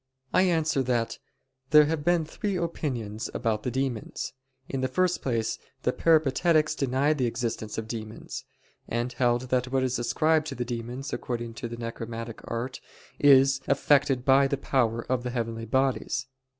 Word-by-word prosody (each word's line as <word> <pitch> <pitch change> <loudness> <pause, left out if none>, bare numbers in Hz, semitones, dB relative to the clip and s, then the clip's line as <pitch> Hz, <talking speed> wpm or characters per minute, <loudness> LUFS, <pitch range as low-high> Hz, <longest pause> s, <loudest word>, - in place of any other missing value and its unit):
I - - +5
answer 160 -4 +2
that, 120 -3 -1 0.5
There 150 +1 +8
have 155 0 -1
been 175 0 +2
three 200 +5 -3
opinions 130 - -3
about 110 -3 0
the 125 - -2
demons. 130 -3 -3 0.3
In 135 - -3
the 130 - +1
first 180 +7 +1
place 115 -4 -1 0.2
the - - +1
Peripatetics 155 0 +3
denied 140 +2 +1
the 125 - +2
existence 115 -2 -3
of 110 -1 -3
demons; 110 -1 -6 0.4
and 120 +2 -2
held 120 -1 +2
that 125 0 +1
what 130 -1 +2
is 130 -1 0
ascribed 155 +5 +2
to - - -5
the 120 - -3
demons, 120 +3 -5
according 120 -1 -3
to 120 +1 -5
the 120 0 -7
necromantic 115 0 -6
art, 120 +3 -4 0.4
is 135 -1 +6
effected 140 -2 +3
by 135 0 +6
the 140 - -1
power 115 -4 0
of 130 -1 0
the 125 - -3
heavenly 115 -2 -3
bodies. 130 +3 0
130 Hz, 165 wpm, -27 LUFS, 115-145 Hz, 0.5 s, There